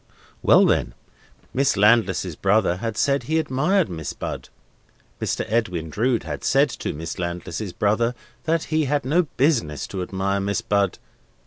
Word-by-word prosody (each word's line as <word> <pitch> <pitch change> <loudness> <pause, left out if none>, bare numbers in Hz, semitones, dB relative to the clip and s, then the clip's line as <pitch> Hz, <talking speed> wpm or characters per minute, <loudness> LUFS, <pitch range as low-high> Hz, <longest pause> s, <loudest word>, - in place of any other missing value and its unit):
Well, - - +6
then. - - +1 0.6
Miss 135 -6 +2
Landless's 100 -5 +3
brother 95 -2 +2
had 115 +2 -4
said 140 0 +2
he 160 +1 -1
admired 160 +5 +1
Miss 80 -4 -5
Bud. - - -6 0.7
Mr. - - -1
Edwin 90 -8 -1
Drood 120 +4 +1
had 75 -3 -6
said - - +3
to - - -4
Miss 80 +5 -6
Landless's 85 +3 -4
brother 115 +6 +1 0.3
that 165 0 +1
he 155 -1 +2
had 145 0 0
no 160 +5 +2
business 120 - +1
to 95 - -5
admire 95 +2 -1
Miss 100 +1 -1
Bud. 100 -1 +1
105 Hz, 150 wpm, -23 LUFS, 90-135 Hz, 0.7 s, Well